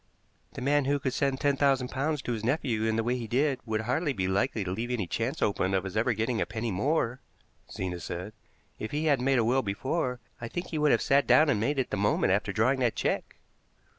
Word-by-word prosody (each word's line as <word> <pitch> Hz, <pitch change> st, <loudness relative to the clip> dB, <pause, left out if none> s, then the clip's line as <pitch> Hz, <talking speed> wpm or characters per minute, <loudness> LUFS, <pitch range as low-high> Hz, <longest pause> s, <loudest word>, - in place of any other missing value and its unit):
"The -, -, -6 dB
man 145 Hz, +1 st, +2 dB
who 145 Hz, +1 st, +2 dB
could 130 Hz, -2 st, -2 dB
send 135 Hz, -1 st, 0 dB
ten 140 Hz, -1 st, +1 dB
thousand 135 Hz, -3 st, +2 dB
pounds 145 Hz, +1 st, -1 dB
to -, -, -3 dB
his 110 Hz, -2 st, -4 dB
nephew 120 Hz, -3 st, 0 dB
in 110 Hz, 0 st, +1 dB
the 115 Hz, -, +1 dB
way 120 Hz, +2 st, 0 dB
he 120 Hz, -2 st, -5 dB
did 135 Hz, +3 st, +1 dB
would 110 Hz, 0 st, 0 dB
hardly 140 Hz, +6 st, 0 dB
be 95 Hz, -5 st, -1 dB
likely 105 Hz, +3 st, 0 dB
to 90 Hz, -, -4 dB
leave 115 Hz, +6 st, -3 dB
any 120 Hz, -6 st, -1 dB
chance 115 Hz, +9 st, -2 dB
open 95 Hz, -2 st, +1 dB
of 95 Hz, -, +1 dB
his 95 Hz, 0 st, -6 dB
ever 115 Hz, +3 st, +2 dB
getting 110 Hz, +2 st, -1 dB
a -, -, 0 dB
penny 110 Hz, 0 st, -3 dB
more," 125 Hz, -, 0 dB, 0.5 s
Zena 90 Hz, -2 st, -4 dB
said. 90 Hz, +5 st, -6 dB, 0.5 s
"If 110 Hz, -, -4 dB
he 150 Hz, +2 st, -2 dB
hadn't 140 Hz, -5 st, +2 dB
made 135 Hz, -1 st, +3 dB
a 115 Hz, -, +3 dB
will 130 Hz, +3 st, +3 dB
before, 125 Hz, +5 st, -2 dB, 0.2 s
I 115 Hz, -, -4 dB
think 175 Hz, +9 st, -5 dB
he 155 Hz, -, -2 dB
would 150 Hz, 0 st, +3 dB
have -, -, +3 dB
sat 140 Hz, 0 st, +3 dB
down 155 Hz, 0 st, +6 dB
and 105 Hz, -, +1 dB
made 140 Hz, +7 st, 0 dB
it 130 Hz, -, -1 dB
the 105 Hz, -, -1 dB
moment 100 Hz, -2 st, +2 dB
after 100 Hz, 0 st, 0 dB
drawing 115 Hz, +6 st, +2 dB
that 120 Hz, -3 st, +1 dB
check." -, -, -2 dB
125 Hz, 245 wpm, -28 LUFS, 110-140 Hz, 0.5 s, down